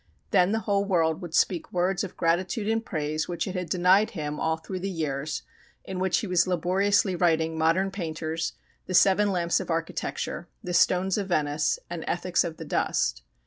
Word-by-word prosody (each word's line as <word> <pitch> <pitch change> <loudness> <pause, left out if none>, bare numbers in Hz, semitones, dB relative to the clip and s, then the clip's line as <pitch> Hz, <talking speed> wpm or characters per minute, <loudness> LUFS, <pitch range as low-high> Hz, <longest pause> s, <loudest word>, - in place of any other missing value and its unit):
Then 180 +1 +4
the 225 +1 0
whole 200 -2 +1
world 165 -3 +1
would 175 -3 -5
speak 175 -4 +1
words 180 +2 0
of 195 - -7
gratitude 185 +6 0
and 225 +1 +1
praise 155 -5 -2
which 175 -1 -2
it 185 - -4
had 180 -3 -4
denied 185 +4 +4
him 150 -1 -3
all 160 0 0
through 185 +3 -6
the 195 +2 -3
years 155 -4 -3 0.4
in 190 -1 -5
which 185 -1 +1
he - - -4
was 180 -2 +2
laboriously 185 +2 +2
writing 160 -2 +2
"Modern 165 +5 +2
Painters," 160 -3 -3 0.3
"The 185 - -1
Seven 195 +3 +5
Lamps 175 -2 +1
of - - -6
Architecture," 165 +1 -3 0.2
"The 180 - -4
Stones 185 +2 +3
of 200 - -3
Venice," 150 -4 +1
and 170 -2 -5
"Ethics 180 0 +1
of 165 -2 -5
the - - -7
Dust." - - 0
175 Hz, 185 wpm, -26 LUFS, 160-190 Hz, 0.4 s, Seven